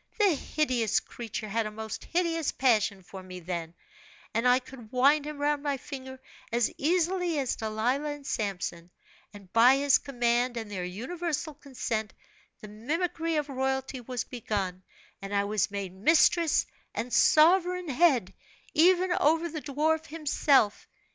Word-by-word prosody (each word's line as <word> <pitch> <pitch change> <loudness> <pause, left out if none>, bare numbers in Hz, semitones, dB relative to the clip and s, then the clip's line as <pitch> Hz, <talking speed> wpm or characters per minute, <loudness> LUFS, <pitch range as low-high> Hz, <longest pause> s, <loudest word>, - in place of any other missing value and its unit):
The 410 -5 +4
hideous 255 -7 0
creature 220 -2 -7
had 220 +1 -1
a - - -7
most 220 0 -7
hideous 330 -2 0
passion 215 -6 +1
for 190 +1 -10
me 185 -1 -9
then, 170 -1 -5 0.6
and 230 +2 +1
I 250 0 +6
could 250 -3 -11
wind 280 +4 +3
him 300 -1 -6
round 290 0 0
my 285 -1 -1
finger 260 -1 -8 0.3
as 235 -1 +1
easily 350 +1 +1
as 270 -3 0
Delilah 235 +7 -1
and 290 -1 -7
Samson; 180 -7 -3 0.4
and 200 -3 -15
by 240 +3 +7
his 280 0 +4
command 245 -2 0
and 220 -2 -5
their 185 -3 -4
universal 305 - -4
consent, 235 -7 -4 0.5
the 215 - -9
mimicry 325 - -2
of 300 -1 0
royalty 265 -1 -2
was 245 0 -4
begun, 200 -6 -4 0.4
and 195 +1 -5
I 200 - +2
was 210 0 0
made 200 -2 -5
mistress 320 - +3 0.3
and 245 +1 -4
sovereign 360 +3 +4
head, 270 - +3 0.4
even 360 +3 +4
over 325 +3 +2
the 310 -1 -5
dwarf 310 +3 0
himself. 290 -7 +1
260 Hz, 150 wpm, -28 LUFS, 215-305 Hz, 0.6 s, by